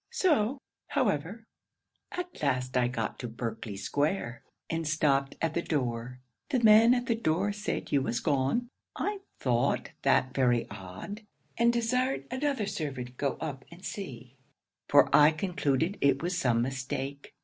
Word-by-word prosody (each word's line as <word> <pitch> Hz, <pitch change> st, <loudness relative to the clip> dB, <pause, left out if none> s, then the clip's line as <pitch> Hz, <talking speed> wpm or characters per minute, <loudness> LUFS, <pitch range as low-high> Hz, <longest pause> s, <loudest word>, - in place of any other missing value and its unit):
] -, -, -53 dB
'So, 285 Hz, -, +2 dB, 0.3 s
however, 205 Hz, -, -1 dB, 0.7 s
at 360 Hz, 0 st, -6 dB
last 130 Hz, -3 st, 0 dB
I 125 Hz, -1 st, +3 dB
got 115 Hz, -3 st, -3 dB
to 120 Hz, -, -4 dB
Berkley 115 Hz, -3 st, -5 dB
square, 145 Hz, -, -1 dB, 0.3 s
and 165 Hz, -1 st, -2 dB
stopped 140 Hz, -3 st, +2 dB
at 165 Hz, -1 st, +1 dB
the 170 Hz, -, 0 dB
door. 125 Hz, -5 st, -2 dB, 0.3 s
The 255 Hz, -, +2 dB
man 225 Hz, +3 st, +8 dB
at 245 Hz, 0 st, -1 dB
the 245 Hz, -, +2 dB
door 195 Hz, -2 st, +1 dB
said 205 Hz, +1 st, -3 dB
you 140 Hz, -, +3 dB
was 120 Hz, -2 st, -1 dB
gone. 140 Hz, -, +1 dB, 0.3 s
I 410 Hz, 0 st, -2 dB, 0.2 s
thought 120 Hz, -2 st, +1 dB
that 130 Hz, 0 st, +3 dB
very 125 Hz, -3 st, +2 dB
odd, 100 Hz, -, -8 dB, 0.3 s
and 235 Hz, +1 st, +4 dB
desired 250 Hz, +3 st, 0 dB
another 260 Hz, -4 st, 0 dB
servant 140 Hz, -10 st, -4 dB
go 140 Hz, -3 st, -1 dB
up 140 Hz, -4 st, -5 dB
and 170 Hz, +3 st, -12 dB
see, 130 Hz, -, -7 dB, 0.5 s
for -, -, +7 dB
I 150 Hz, 0 st, +8 dB
concluded 165 Hz, +1 st, 0 dB
it 140 Hz, +1 st, +3 dB
was 180 Hz, +1 st, -1 dB
some 120 Hz, -8 st, +2 dB
mistake. 135 Hz, +2 st, -4 dB
145 Hz, 150 wpm, -29 LUFS, 125-210 Hz, 0.7 s, man